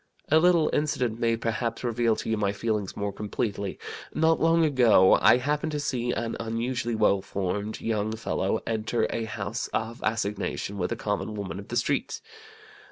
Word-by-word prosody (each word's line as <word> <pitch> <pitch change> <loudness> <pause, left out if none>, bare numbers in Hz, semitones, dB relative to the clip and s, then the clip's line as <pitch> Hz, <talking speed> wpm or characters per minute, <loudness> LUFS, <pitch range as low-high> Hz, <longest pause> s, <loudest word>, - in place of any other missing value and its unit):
A 155 - +6
little 170 -2 +4
incident 125 -6 0
may, 115 -1 +2
perhaps, 115 +1 -2
reveal 120 -1 +1
to - - -6
you 110 - +1
my 100 -2 0
feelings 105 -2 -2
more 100 -1 -2
completely. 100 -1 -3 0.4
Not 160 +1 +3
long 165 0 +4
ago 120 -10 +5
I - - +7
happened 150 +4 -1
to 150 - -1
see 125 -4 -1
an 115 -1 -2
unusually 115 +1 -2
well 100 -2 +3
formed 100 +3 -3
young 110 -1 -1
fellow 110 -1 -1
enter 110 +1 0
a 115 - -2
house 110 - -4
of 115 +2 -2
assignation 105 -2 -2
with 90 - -1
a - - 0
common 105 +1 -3
woman 100 -3 -5
of 100 - -10
the 120 - -5
streets. 120 - -1
115 Hz, 170 wpm, -27 LUFS, 105-125 Hz, 0.4 s, I